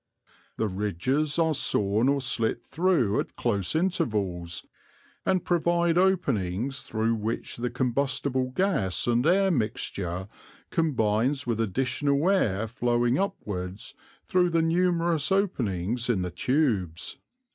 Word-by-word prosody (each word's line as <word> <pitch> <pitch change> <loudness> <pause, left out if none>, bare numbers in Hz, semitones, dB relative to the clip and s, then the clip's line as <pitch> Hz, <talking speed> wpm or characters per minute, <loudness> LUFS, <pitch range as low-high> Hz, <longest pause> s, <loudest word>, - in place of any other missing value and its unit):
The 110 - 0
ridges 105 - -1
are 160 -1 +3
sawn 105 -2 +1
or 140 0 +1
slit 120 -2 0
through 160 - +1
at - - -4
close 100 - 0
intervals, 105 - -1 0.6
and 185 -2 +1
provide 170 -1 +2
openings 135 - +1
through 110 0 -1
which 110 +1 -3
the 120 +1 -2
combustible 130 +1 0
gas 135 - 0
and 120 0 +2
air 190 +2 +4
mixture 100 - -2 0.4
combines 135 -2 +1
with 115 -2 -1
additional 135 - +1
air 110 - +1
flowing 120 +2 +1
upwards 100 - -4 0.3
through 180 -1 +3
the 165 -1 +2
numerous 170 -1 +1
openings 120 - 0
in 100 -6 +1
the 90 - -4
tubes." 100 - -1
125 Hz, 115 wpm, -27 LUFS, 105-165 Hz, 0.6 s, air